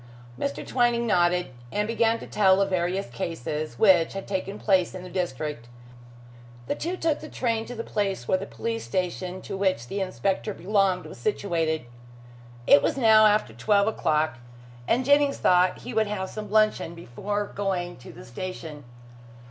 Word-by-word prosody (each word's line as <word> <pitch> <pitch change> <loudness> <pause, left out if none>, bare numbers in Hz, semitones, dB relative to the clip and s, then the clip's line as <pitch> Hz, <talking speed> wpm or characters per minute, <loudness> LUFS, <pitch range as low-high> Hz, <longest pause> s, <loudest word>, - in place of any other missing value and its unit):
Mr. 140 +3 -3
Twining 240 -2 +1
nodded, 180 - +2 0.2
and 210 0 -1
began 230 0 +2
to - - -9
tell 190 -2 +3
of 195 0 +1
various 185 +2 0
cases 155 -6 -4
which 180 -6 +5
had 195 0 -6
taken 195 +1 -3
place 190 -4 +2
in 185 - -7
the 180 - -10
district. 150 -8 -3 1.0
The - - -1
two 355 +3 -3
took 320 -4 0
the 310 - -9
train 230 -3 -1
to 245 - -7
the 230 - -4
place 195 - -2
where 185 - +2
the 195 - -6
police 230 0 -4
station 185 0 -3
to - - -5
which 190 -11 0
the 200 +10 -4
inspector 190 - -2
belonged 195 -1 +1
was - - -10
situated. 165 - -1 0.8
It 140 - +7
was - - 0
now 220 -3 +6
after 210 - +1
twelve 200 - +2
o'clock, 155 - 0 0.5
and 245 +2 +2
Jennings 285 0 +4
thought 180 0 +3
he 250 - -7
would 220 -1 +2
have 190 -2 -4
some 210 -1 -6
luncheon 215 -5 +2
before 200 - -4
going 185 -3 -2
to 125 - -12
the - - -12
station. 160 +2 -7
190 Hz, 170 wpm, -26 LUFS, 170-215 Hz, 1.0 s, It